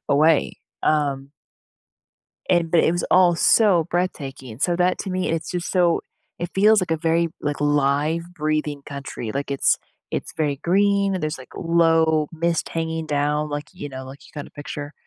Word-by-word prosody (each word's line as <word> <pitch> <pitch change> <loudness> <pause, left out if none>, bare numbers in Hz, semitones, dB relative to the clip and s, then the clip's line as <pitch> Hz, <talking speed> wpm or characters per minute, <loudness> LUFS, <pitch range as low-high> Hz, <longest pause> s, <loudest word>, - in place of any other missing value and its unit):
away." 155 +2 +3 0.2
Um 140 -2 0 1.2
and 170 -3 +2
but 170 - +5
it 165 - +3
was 175 - -1
all 180 -2 +5
so 180 -3 +4
breathtaking, 135 -9 -3
so 175 +5 +1
that 180 +1 +2
to 190 - -4
me, 185 0 -1
it's 165 0 -2
just 175 -1 -3
so 175 -3 +3 0.4
it 175 - -4
feels 210 +2 +5
like 180 - -3
a 160 - +2
very, 165 +1 +1
like, 145 0 -3
live 145 +3 +1
breathing 150 -2 -2
country. 140 -5 -6
Like, 140 +1 -3
it's 140 - +2 0.3
it's - - -4
very 150 -3 0
green, 200 +4 +2
and 185 - -3
there's, 155 -2 -2
like, 130 - -13
low 165 -2 +3
mist 165 0 -1
hanging 160 -1 -3
down, 150 +1 0
like, 145 0 -5
you 160 -6 -7
know, 130 -1 -7
like, 135 +2 -11
you - - -18
kinda 145 - -7
picture, 145 0 -7
160 Hz, 175 wpm, -22 LUFS, 145-175 Hz, 1.2 s, but